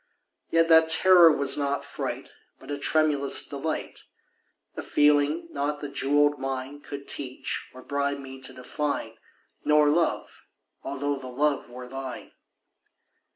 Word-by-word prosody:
Yet 165 0 +3
that 160 -1 +5
terror 175 0 +7
was 140 -1 +4
not 140 0 -2
fright, - - -6 0.3
But - - -11
a 145 - -4
tremulous 145 -1 +3
delight— 145 +3 -5 0.7
A - - -5
feeling 150 +3 +2
not 145 +1 -2
the 145 - -6
jewelled 145 +1 +1
mine 135 +2 -5
Could 140 -1 -9
teach 130 -2 -4
or 130 0 -13
bribe 140 0 -2
me 135 -1 -10
to - - -6
define— 125 -3 -4 0.4
Nor 150 -1 +4
Love—although 145 -3 -3
the 130 -1 -9
Love 140 +1 -1
were 125 +1 -9
thine. 135 0 -8
145 Hz, 130 wpm, -26 LUFS, 135-150 Hz, 0.7 s, terror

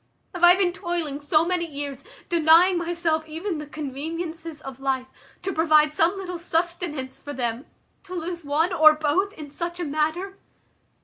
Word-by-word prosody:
Have 355 -1 -6
I 350 +1 +9
been 370 -2 +1
toiling 345 -6 -3
so 305 +2 +3
many 350 -1 0
years, 280 -2 -6 0.2
denying 340 +2 +5
myself 335 -2 -1
even 325 +2 -4
the 300 - -7
conveniences 315 +3 -5
of 270 -4 -9
life, 265 -1 -1 0.4
to 385 - -2
provide 305 -2 +4
some 335 +5 +2
little 360 -2 -5
sustenance 330 -5 -2
for 290 - -7
them, 240 0 -3 0.4
to 370 -1 -7
lose 345 0 -4
one 310 +5 +1
or 310 -2 +7
both 310 +6 +1
in 295 -2 -10
such 345 +3 -4
a - - -1
manner?" 315 +6 -1
320 Hz, 165 wpm, -24 LUFS, 295-350 Hz, 0.4 s, I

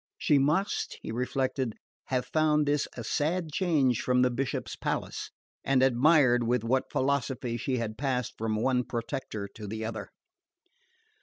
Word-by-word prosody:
"She 145 -2 +3
must," 155 +9 0
he - - -4
reflected, 125 0 -1 0.3
"have 130 -1 -1
found 150 -1 +2
this 145 0 +1
a 120 - -4
sad 160 +6 -1
change 145 - +2
from 125 0 +3
the 125 - +3
Bishop's 130 +2 -3
palace;" - - -3 0.3
and 130 -1 +3
admired 130 -1 +5
with 120 -1 +1
what 130 +3 0
philosophy 130 -3 0
she 130 +3 -1
had 110 -2 -4
passed 130 -4 -1
from 110 -1 -1
one 125 +3 +1
protector 115 -3 -4
to 105 -1 -8
the 110 +2 -4
other. 110 0 -5
130 Hz, 150 wpm, -29 LUFS, 120-140 Hz, 0.3 s, admired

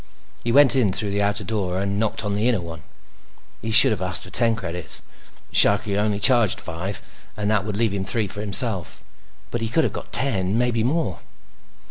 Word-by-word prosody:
He 120 - -1
went 140 +2 +5
in 120 -7 +2
through 100 +2 -2
the 100 +1 0
outer 100 0 0
door 95 -5 -2
and 100 +1 -2
knocked 110 0 0
on 100 - -1
the 105 +4 +1
inner 115 -5 +1
one. 85 -1 -8 0.8
He 115 - -4
should 110 +1 +6
have 105 - -2
asked 90 0 -2
for 95 - -7
ten 115 -2 +3
credits. 90 -7 -4 0.5
Sharkie 100 0 +3
only 105 0 0
charged 120 -4 +3
five, 90 +4 -5 0.3
and 105 0 -1
that 105 -2 +1
would 105 -1 -4
leave 115 -1 +1
him 100 -1 -2
three 105 +2 -1
for 105 +2 -6
himself. 105 - -1 0.5
But 120 - -3
he 115 - -2
could 160 +7 +2
have - - -1
got - - -8
ten—maybe 115 -1 +1
more. 125 - -1
105 Hz, 195 wpm, -22 LUFS, 95-115 Hz, 0.8 s, should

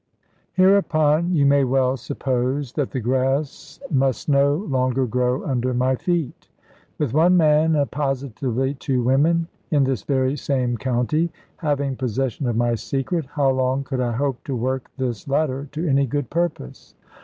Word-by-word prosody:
Hereupon, 175 -3 +3
you 145 -3 +3
may 140 0 +4
well 130 0 +2
suppose 130 0 -2
that 145 -4 -1
the 130 - -3
grass 130 +4 -1
must 135 -3 +1
no 140 0 +4
longer 130 - 0
grow 125 +2 -1
under 130 -2 -1
my 130 +1 +2
feet. 170 -1 -2 0.5
With 140 -6 -1
one 175 +4 +4
man, 155 0 +4
and 145 -2 0
positively 135 -2 -2
two 130 -2 -1
women, 160 +7 +2 0.2
in 145 -3 +3
this 130 -5 -1
very 130 -1 0
same 130 -3 -1
county, 130 +7 0 0.3
having 140 -4 -1
possession 130 +1 -2
of 120 - 0
my 120 0 +2
secret, 135 +6 -2
how 140 -1 +1
long 130 +1 0
could 135 -1 -4
I 120 -1 -1
hope 135 +1 -2
to 135 - -3
work 130 +2 -2
this 125 -4 -3
latter 140 -1 -1
to 160 +3 -2
any 140 -1 +2
good 145 0 -3
purpose? 170 - -3
135 Hz, 155 wpm, -22 LUFS, 130-150 Hz, 0.5 s, may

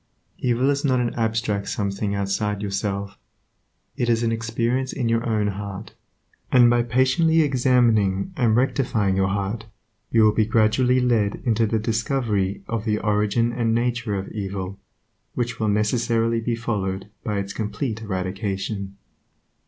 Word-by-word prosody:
Evil 125 +3 +2
is 140 0 -1
not 130 -3 +2
an 120 -1 -1
abstract 110 -3 -1
some 100 -2 -1
thing 100 +1 -2
outside 100 +1 -1
yourself; 100 0 -3 0.8
it 120 - -1
is 115 0 +2
an 115 - +1
experience 115 +3 -1
in 125 -3 -2
your 115 0 +1
own 105 -2 +1
heart, 100 +1 -6 0.6
and 120 -2 +6
by 120 0 +3
patiently 130 +7 +3
examining 120 -8 +2
and 115 -4 +2
rectifying 120 -6 +1
your 95 0 +2
heart 100 +3 -2 0.4
you 115 -1 +4
will 105 - +6
be 110 - +3
gradually 115 +4 +3
led 115 -5 +2
into 115 -2 +2
the 110 - 0
discovery 110 -3 -1
of 115 -2 -2
the 105 -2 0
origin 105 +3 +1
and 115 -2 +1
nature 120 -2 -1
of 95 0 -4
evil, 95 -2 -5 0.6
which 120 -1 -2
will 110 -1 +1
necessarily 115 +2 +1
be 115 +1 -1
followed 100 -5 -3 0.2
by 105 -2 -2
its 100 0 -3
complete 110 +2 -3
eradication. 95 0 -3
110 Hz, 150 wpm, -23 LUFS, 100-120 Hz, 0.8 s, and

